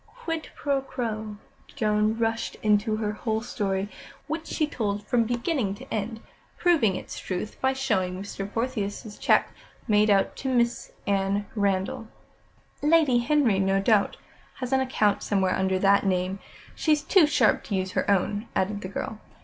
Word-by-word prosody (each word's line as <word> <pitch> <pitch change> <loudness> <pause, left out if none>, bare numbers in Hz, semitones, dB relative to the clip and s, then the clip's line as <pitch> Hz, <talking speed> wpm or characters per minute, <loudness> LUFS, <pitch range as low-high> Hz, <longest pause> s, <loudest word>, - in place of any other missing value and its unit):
"Quid 350 -9 -5
pro 280 -2 0
quo." 220 -5 -4 0.4
Joan 215 -3 +1
rushed 225 0 -1
into 215 +1 +3
her 215 -1 -1
whole 220 +1 -2
story, 195 -4 -2 0.4
which 315 +2 -4
she 310 - 0
told 210 -7 -3
from 240 -1 +2
beginning 240 - -1
to - - -9
end, 220 +1 -3 0.4
proving 295 - +3
its - - -6
truth 190 +3 -5
by 265 0 +2
showing 190 -9 -1
Mr. 195 0 -6
Portheous' 220 -3 -3
cheque - - +3 0.4
made 210 -1 +4
out 195 -1 +3
to 265 - -3
Mrs. 240 -1 +1 0.2
Anne 200 +1 +1
Randall. 200 +1 -1 0.7
"Lady 300 -5 +4
Henry, 240 -6 +2
no 195 0 +2
doubt, 205 0 +2 0.4
has 255 0 -4
an 265 - +4
account 215 -6 +1
somewhere 190 -2 +1
under 190 0 +1
that 200 +1 +4
name. 185 0 0 0.3
She's 305 -2 +1
too 355 -3 +5
sharp 250 -7 +3
to 200 - -2
use 190 0 -1
her - - -1
own," 205 +3 +1
added 205 +2 0
the 185 - -5
girl. 210 +2 -5
215 Hz, 155 wpm, -26 LUFS, 200-255 Hz, 0.7 s, too